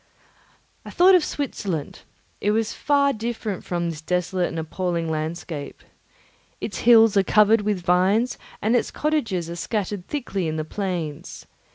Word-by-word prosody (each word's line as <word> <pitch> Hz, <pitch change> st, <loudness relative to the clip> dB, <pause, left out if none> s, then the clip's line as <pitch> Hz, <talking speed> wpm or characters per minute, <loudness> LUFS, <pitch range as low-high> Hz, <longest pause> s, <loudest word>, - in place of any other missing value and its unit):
I -, -, -9 dB
thought 370 Hz, +2 st, +5 dB
of 360 Hz, -3 st, +5 dB
Switzerland; 195 Hz, -, -4 dB, 0.4 s
it 205 Hz, -, +1 dB
was 220 Hz, +1 st, 0 dB
far 280 Hz, -1 st, +2 dB
different 220 Hz, -3 st, -4 dB
from 175 Hz, -1 st, -2 dB
this 155 Hz, -2 st, -8 dB
desolate 180 Hz, +2 st, 0 dB
and 165 Hz, -, -6 dB
appalling 165 Hz, 0 st, -2 dB
landscape. 155 Hz, -1 st, -5 dB, 0.8 s
Its 210 Hz, -, -5 dB
hills 225 Hz, -2 st, +7 dB
are -, -, +6 dB
covered 210 Hz, +3 st, +4 dB
with 205 Hz, -3 st, -1 dB
vines, 190 Hz, +8 st, +2 dB, 0.2 s
and 220 Hz, +4 st, +3 dB
its 240 Hz, -, +1 dB
cottages 230 Hz, -, -1 dB
are 170 Hz, -, -6 dB
scattered 200 Hz, 0 st, -3 dB
thickly 200 Hz, -, -3 dB
in 155 Hz, -, -2 dB
the 155 Hz, -1 st, -3 dB
plains. 170 Hz, -5 st, -5 dB
195 Hz, 150 wpm, -23 LUFS, 170-225 Hz, 0.8 s, hills